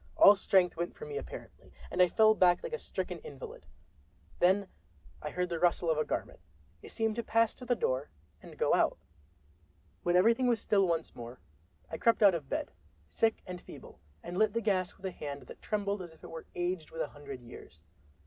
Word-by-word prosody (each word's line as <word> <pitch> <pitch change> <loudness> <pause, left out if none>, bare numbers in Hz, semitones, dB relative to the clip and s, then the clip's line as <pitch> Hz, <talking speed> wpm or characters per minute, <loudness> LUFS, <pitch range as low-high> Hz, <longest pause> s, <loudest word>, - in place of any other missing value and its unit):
All 200 - +10
strength 190 -3 +2
went 170 +1 -3
from 460 - -9
me 435 - -4
apparently, 450 - -9 0.2
and 180 - +2
I 180 - +7
fell 220 +4 +5
back 180 -4 +4
like 485 - -5
a 470 - -2
stricken - - -4
invalid. 485 0 -10 0.7
Then 190 +2 +4 0.5
I - - -4
heard 180 0 -1
the 170 -1 -2
rustle 175 -1 +2
of 155 - +1
a - - +3
garment—it 80 - -7
seemed 225 -1 -1
to 235 - -1
pass 225 0 +2
to 250 - -10
the 245 0 +2
door 130 - -1 0.3
and - - -13
go - - +2
out. - - +3 1.0
When 175 0 +1
everything 230 +7 +4
was 235 -2 +3
still 200 -2 +2
once 165 -1 -1
more, 120 +1 -9 0.5
I 160 - -4
crept 230 -1 +3
out 200 -2 +8
of 150 -5 -4
bed, - - -2 0.4
sick 225 - 0
and 180 -1 -7
feeble, - - -12 0.2
and 180 +2 -4
lit 215 -1 +3
the 230 - +1
gas 190 -4 0
with 195 - -11
a 190 - -2
hand 145 -4 -6
that - - -13
trembled 205 -2 -1
as 175 -2 -9
if 160 - -22
it - - -9
were 165 0 -8
aged 175 -2 -2
with 165 - -5
a - - -5
hundred 140 -3 -9
years. 120 -8 -13
185 Hz, 205 wpm, -31 LUFS, 165-220 Hz, 1.0 s, All